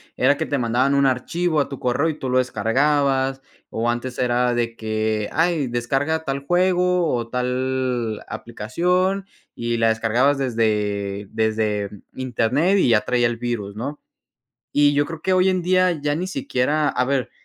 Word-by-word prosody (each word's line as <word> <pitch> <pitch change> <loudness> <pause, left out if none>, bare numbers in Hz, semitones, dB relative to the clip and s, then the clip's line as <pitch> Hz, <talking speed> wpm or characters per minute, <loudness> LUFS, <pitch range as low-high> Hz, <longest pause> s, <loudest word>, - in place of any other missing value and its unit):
era 140 +3 +3
que 160 - -2
te 145 - -1
mandaban 125 +3 +1
un 140 0 +3
archivo 155 +6 0
a 140 - +1
tu 140 - -8
correo 125 +5 +1
y 155 -2 -2
tú 130 - -3
lo 125 - +2
descargabas, 135 +3 +1 0.3
o 115 +1 -1
antes 120 +1 -3
era 125 0 +2
de 115 -1 -1
que, 110 -1 -1
ay 165 -3 +1
descarga 135 +7 -1
tal 140 -1 -3
juego 180 0 +2
o 120 -2 -2
tal 125 -2 -1
aplicación, 180 - -1 0.3
y 120 0 -2
la 115 0 +3
descargabas 115 +5 +2
desde 105 -5 -1
desde 110 -2 0 0.3
internet 130 - +1
y 180 - +3
ya 110 -2 +4
traía 120 -1 +1
el 120 0 -3
virus, 115 -4 -4
¿no?, 140 +7 -5 0.7
y 145 0 +4
yo 145 0 +2
creo 165 -1 -8
que 190 - +1
hoy 185 0 +4
en 185 -1 +1
día 185 +1 +3
ya 145 0 +1
ni 175 +4 -2
siquiera 145 -2 0
a - - 0
ver, 135 -2 -1
130 Hz, 170 wpm, -22 LUFS, 115-150 Hz, 0.7 s, ya